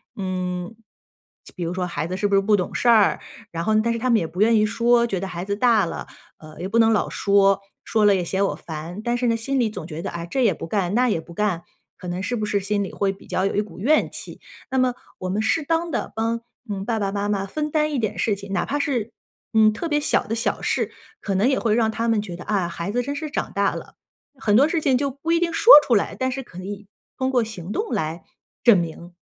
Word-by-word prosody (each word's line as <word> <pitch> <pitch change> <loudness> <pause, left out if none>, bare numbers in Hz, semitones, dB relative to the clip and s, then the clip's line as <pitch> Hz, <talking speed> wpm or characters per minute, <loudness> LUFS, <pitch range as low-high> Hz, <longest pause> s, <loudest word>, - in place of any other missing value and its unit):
嗯， 185 -1 -3 0.8
比 180 - -4
如 170 +1 -2
说 185 -1 -1
孩 170 -2 -3
子 185 +2 -4
是 205 - +1
不 200 - -3
是 195 - +5
不 210 +1 +3
懂 180 - -3
事 245 - +1
儿， 220 -4 +5 0.3
然 165 0 -3
后 215 +4 +2
但 235 0 +1
是 230 - -3
他 255 - -1
们 235 - +5
呢 - - +4
也 165 - -2
不 180 +4 -5
愿 225 +1 +5
意 215 - +4
说， 235 +2 +3
觉 195 -6 -2
得 195 - -4
孩 180 -1 -5
子 200 0 -1
大 225 -3 +3
了， 165 - -6 0.3
呃， 155 0 -13
也 180 - -3
不 230 +4 +1
能 225 0 +5
老 215 - +2
说， 200 -1 +3 0.2
说 220 -1 +1
了 205 -1 +6
也 185 - 0
嫌 190 +3 0
我 - - -1
烦， 165 +4 -7
但 240 +2 -1
是 245 - 0
呢， 230 -1 +2
心 270 +5 -2
里 225 - +1
总 170 -6 -7
觉 160 -1 -6
得， - - -4
哎， 170 0 -5
这 255 +9 -1
也 210 - +4
不 165 - -7
干， 195 -1 -1
那 250 +2 +3
也 190 -8 0
不 170 - -13
干， 185 -3 -1 0.3
可 180 -3 -7
能 175 +1 -3
是 245 +5 -2
不 215 -2 -2
是 205 -1 0
心 200 +1 -1
里 195 - -5
会 195 -1 0
比 195 - -17
较 185 - 0
有 195 - -1
一 205 - +3
股 195 -5 -10
怨 295 +10 +2
气。 - - -9 0.3
那 265 - 0
么 255 -1 +3 0.3
我 185 - -4
们 200 +3 0
适 315 +8 +1
当 330 +3 0
地 - - -2
帮， 230 +1 -1 0.3
嗯， 195 -2 -3
爸 225 +1 -1
爸 195 -1 -1
妈 205 0 -1
妈 195 -2 0
分 300 +9 -3
担 305 -1 +1
一 - - 0
点 215 -1 -2
事 210 - +1
情， 200 0 -10
哪 195 - 0
怕 290 - -2
是， 240 -7 -1 0.4
嗯， 220 -1 +6
特 230 +11 -4
别 295 -1 +1
小 - - +1
的 225 - -1
小 230 +1 -1
事， - - 0 0.3
可 200 - -2
能 200 +6 +3
也 265 0 +2
会 220 -2 +1
让 225 -1 +2
他 230 +1 -1
们 225 -2 +2
觉 180 -4 -7
得， 175 - -9
啊， 195 -5 0
孩 170 +2 -4
子 245 +3 0
真 280 +3 -4
是 305 +1 -4
长 - - -3
大 200 0 +1
了， - - -9 0.4
很 210 -5 +2
多 280 +5 +6
事 330 0 0
情 270 -3 +3
就 280 +2 0
不 285 +5 -4
一 335 - +4
定 340 -1 0
说 455 +8 +8
出 240 - +3
来， 205 - 0
但 260 0 -1
是 270 +1 -4
可 180 -6 -12
以 200 +1 -7 0.3
通 260 -1 0
过 245 -3 +3
行 200 -5 -7
动 430 - -2
来 160 +2 -2 0.4
证 235 -4 +7
明。 170 +1 -5
210 Hz, 295 characters per minute, -23 LUFS, 190-240 Hz, 0.8 s, 说